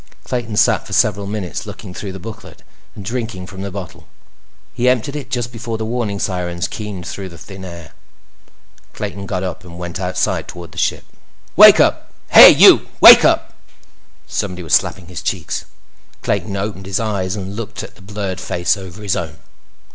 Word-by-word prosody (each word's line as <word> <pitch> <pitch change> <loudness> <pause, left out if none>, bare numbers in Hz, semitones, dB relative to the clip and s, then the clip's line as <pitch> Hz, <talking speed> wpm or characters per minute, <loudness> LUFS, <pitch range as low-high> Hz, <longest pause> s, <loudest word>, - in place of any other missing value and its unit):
Clayton 120 -4 -4
sat 115 -1 +2
for 100 - -8
several 100 -2 +1
minutes, 100 -4 -5
looking 90 - -9
through 100 +1 -6
the 95 - -8
booklet 115 +3 -11 0.3
and 100 - -10
drinking 115 -5 -4
from 95 +1 -10
the 100 - -4
bottle. 95 -2 -9 0.7
He 125 +1 +1
emptied 130 +3 0
it 145 -3 -6
just 120 -1 -3
before 115 -1 -5
the 110 - -4
warning 110 -3 -2
sirens 90 -3 -3
keened 105 -5 -7
through 95 0 -6
the 85 - -13
thin 95 +1 -11
air. 85 -3 -10 1.0
Clayton 100 0 -6
got 95 -1 -3
up 90 -1 -5
and 85 -2 -12
went 90 0 -6
outside 90 -1 -1
toward 85 -2 -10
the - - -8
ship. - - -1 0.5
"Wake - - +9
up! - - +1 0.2
Hey, - - +11
you! - - +7
Wake - - +10
up!" - - +2 0.7
Somebody 90 -3 -4
was 80 - -4
slapping 90 -2 +1
his 90 0 -8
cheeks. - - -3 0.6
Clayton 100 -2 -2
opened 95 -1 -5
his 95 - -1
eyes 100 -4 -2
and 100 -1 -6
looked 115 -1 -6
at - - -10
the - - -20
blurred 100 -1 -5
face 85 +2 0
over 95 +1 -10
his 100 -3 0
own. 80 -3 -5
100 Hz, 180 wpm, -18 LUFS, 90-110 Hz, 1.0 s, Hey